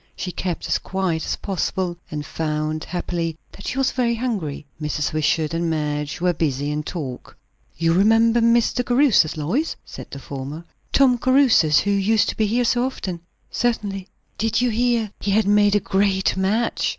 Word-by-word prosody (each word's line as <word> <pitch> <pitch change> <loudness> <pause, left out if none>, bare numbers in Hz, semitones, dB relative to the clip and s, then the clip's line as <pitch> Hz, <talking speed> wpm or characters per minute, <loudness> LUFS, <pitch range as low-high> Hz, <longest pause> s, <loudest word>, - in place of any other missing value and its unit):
She 180 - -4
kept 180 -1 -4
as - - +1
quiet 185 -4 -2
as - - 0
possible, 185 -2 -2
and 150 -1 -5
found, 155 0 -2
happily, 170 -2 -3
that - - -10
she - - -3
was 270 -1 +2
very 240 -2 0
hungry. 205 - -3 0.2
Mrs. 150 -1 -2
Wishart 155 0 +1
and 165 0 0
Madge 150 -1 -2
were 180 +1 +2
busy 145 -3 -1
in 150 0 -1
talk. 145 -6 -7 0.4
"You 165 0 +2
remember 225 +5 +4
Mr. 235 +2 +3
Caruthers, 245 - +3
Lois?" 220 - -1
said - - -9
the - - -8
former; 140 +4 -7 0.3
"Tom 255 -3 +4
Caruthers, 255 - +4
who 205 - 0
used 200 +2 +2
to - - -3
be 215 - +1
here 240 +4 +1
so 240 +1 +2
often?" 190 -9 -4 0.3
"Certainly." 200 -5 -1 0.3
"Did 225 +2 +1
you 245 -1 +2
hear 230 -2 +1
he - - -3
had 210 +1 +3
made 205 0 +4
a - - +4
great 195 -1 +1
match?" 200 +5 0
190 Hz, 175 wpm, -22 LUFS, 155-230 Hz, 0.4 s, remember